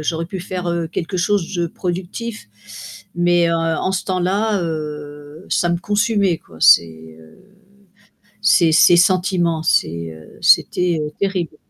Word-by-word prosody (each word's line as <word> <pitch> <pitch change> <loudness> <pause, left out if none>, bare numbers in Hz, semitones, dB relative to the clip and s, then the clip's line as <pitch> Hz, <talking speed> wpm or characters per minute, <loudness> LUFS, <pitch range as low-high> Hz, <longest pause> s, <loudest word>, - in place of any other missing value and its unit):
J'aurais 165 +2 -2
pu 190 - -6
faire, 180 0 -5
heu, 170 -1 -2
quelque 175 +3 -5
chose 195 0 -1
de 170 -1 -1
productif 185 - -6 0.7
mais 175 -1 +2
heu, - - 0
en 165 +2 -1
ce 190 -1 -2
temps-là, 190 +2 0
heu, 150 0 -7
ça 175 - +1
me 170 - 0
consumait 205 -3 0
quoi, 80 - -18
ces, 80 -1 +3
heu, 80 0 -19 1.0
ces 175 -5 +4
ces 175 +2 +6
sentiments, 175 -2 +1
c'est, 85 - 0
heu, 80 -1 -15
c'était, 180 -2 +3
heu, 150 0 -4
terrible. 185 -6 -2
175 Hz, 145 wpm, -19 LUFS, 155-185 Hz, 1.0 s, ces